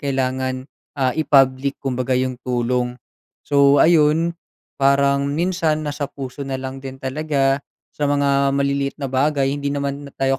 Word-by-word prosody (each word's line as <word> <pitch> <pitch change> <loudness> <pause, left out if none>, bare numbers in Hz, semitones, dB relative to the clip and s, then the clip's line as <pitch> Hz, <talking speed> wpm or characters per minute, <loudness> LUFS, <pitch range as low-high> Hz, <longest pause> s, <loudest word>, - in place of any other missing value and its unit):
kailangan 130 -2 -2 0.3
ah, 130 -1 +2
i-public 135 -3 +3
kumbaga 130 -1 -1
'yong 130 -1 -1
tulong. 125 0 -1 0.5
So, 140 0 +5
ayun 165 +1 +3 0.5
parang 140 0 +3
minsan 165 -2 0
nasa 145 -1 -3
puso 135 0 -7
na 135 -1 -3
lang 130 0 -6
din 135 0 -8
talaga, 140 0 0 0.3
sa 145 - -1
mga 140 -1 +2
maliliit 140 0 0
na 140 - -1
bagay 135 0 +1
hindi 140 0 -3
naman 140 0 -3
tayo 135 0 +2
140 Hz, 140 wpm, -20 LUFS, 130-145 Hz, 0.5 s, So